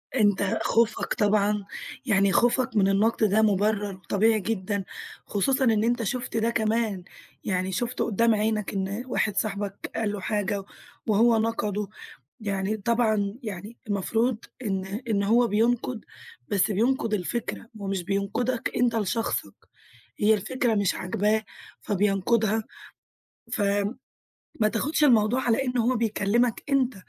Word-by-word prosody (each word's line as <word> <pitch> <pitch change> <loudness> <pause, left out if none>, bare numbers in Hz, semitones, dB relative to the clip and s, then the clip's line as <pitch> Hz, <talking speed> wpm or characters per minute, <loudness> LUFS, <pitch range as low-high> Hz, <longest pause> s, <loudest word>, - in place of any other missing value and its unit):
أنت 205 -2 +2
خوفك 230 0 +1
طبعًا 210 -1 +1 0.4
يعني 200 -5 +3
خوفك 245 +1 +2
من 200 -2 +4
النقد 210 +4 +2
ده 215 +3 +3
مبرّر 205 -1 +1
طبيعي 220 +2 +3
جدًا، 200 -1 -2 0.4
خصوصًا 265 +7 +1
إن 220 -3 +3
أنت 235 0 +1
شُفت 245 +2 -3
ده 225 +1 +2
كمان، 220 -4 0 0.4
يعني 185 -1 -1
شُفته 240 +6 -1
قدّام 230 +1 +3
عينك 215 -1 -1
إن 195 +4 -2
واحد 210 -5 -1
صاحبك 200 -1 -3
قال 225 -2 0
له 205 - -4
حاجة 205 0 -1 0.4
وهو 225 +2 +4
نقَدُه، 210 -2 -1 0.5
يعني 200 +1 -1
طبعًا 215 -2 +1
يعني 210 +1 -7
المفروض 225 +4 0 0.3
إن 190 -2 -1 0.2
إن 200 -2 +1
هو 235 +4 +4
بينقد 230 +2 0 0.4
بس 205 +1 +2
بينقد 230 +2 +1
الفكرة 225 +4 -3
هو 195 - -4
مش 195 -2 -2
بينقدك 200 +6 -1
أنت 240 -2 +2
لشخصك، 225 +2 -1 0.6
هي 210 +1 +4
الفكرة 230 +3 0
مش 200 -3 +1
عاجباه 210 +4 0 0.4
فبينقدها 210 +2 +1 0.9
ف 230 - -1 1.0
ما 215 - +4
تاخدش 285 +8 +1
الموضوع 240 -1 +4
على 245 +2 +1
إن 250 -1 -1
هو 245 +2 +2
بيكلمك 225 +1 +1
أنت، 265 -2 +2
215 Hz, 130 wpm, -26 LUFS, 200-230 Hz, 1.0 s, من